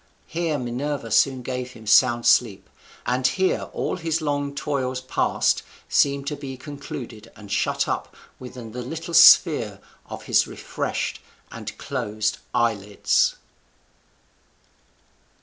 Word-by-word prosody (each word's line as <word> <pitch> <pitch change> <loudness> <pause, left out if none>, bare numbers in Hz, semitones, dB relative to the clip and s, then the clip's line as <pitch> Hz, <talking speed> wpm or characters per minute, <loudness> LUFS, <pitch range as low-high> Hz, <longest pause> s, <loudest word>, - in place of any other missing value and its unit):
Here 165 -3 -2
Minerva 125 0 -3
soon 130 -2 +3
gave 125 0 -4
him 110 - -13
sound 115 +3 +4
sleep; 110 -6 +3 0.4
and 125 +1 +2
here 190 +7 0
all - - -2
his 165 -2 -1
long 145 -2 -2
toils 130 -3 -2
past 130 +1 +1 0.3
seemed 140 -1 +2
to 150 +1 -2
be 135 -2 -7
concluded 130 -5 -8
and 105 -2 -12
shut - - 0
up - - -3 0.2
within 125 -3 -9
the 125 +2 -5
little 165 +7 -6
sphere 150 - +6 0.3
of - - -8
his - - +3
refreshed - - -4 0.3
and - - -8
closed 110 +1 -2
eyelids. 105 -4 +1
130 Hz, 120 wpm, -24 LUFS, 115-145 Hz, 0.4 s, sphere